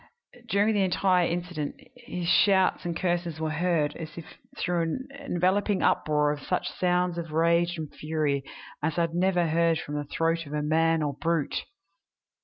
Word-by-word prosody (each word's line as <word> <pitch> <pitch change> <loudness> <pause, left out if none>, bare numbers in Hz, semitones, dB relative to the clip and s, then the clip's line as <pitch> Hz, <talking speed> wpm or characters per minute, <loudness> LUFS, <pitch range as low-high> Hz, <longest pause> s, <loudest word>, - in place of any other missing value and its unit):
During 205 +2 +3
the 205 - +2
entire 185 -1 +2
incident 175 -4 -3 0.2
his 210 -8 -6
shouts 190 0 +4
and 170 -1 -2
curses 175 -3 -1
were 160 -1 -1
heard, 160 -2 0
as 160 0 -8
if 165 - -7 0.3
through 175 -1 0
an 165 +11 -3
enveloping 195 -4 +1
uproar 150 -1 +2
of 150 - -4
such 180 - -1
sounds 180 -1 0
of 165 -2 -6
rage 170 +2 +2
and 155 -2 -6
fury 150 -3 -1 0.4
as 150 +2 -1
I - - +3
had 165 -1 0
never 180 0 +2
heard 165 0 +2
from 150 -2 -6
the 145 0 -2
throat 165 +2 -1
of 145 - -8
man 160 +2 +2
or 145 -1 -1
brute! 165 +1 -1
170 Hz, 170 wpm, -27 LUFS, 155-180 Hz, 0.4 s, shouts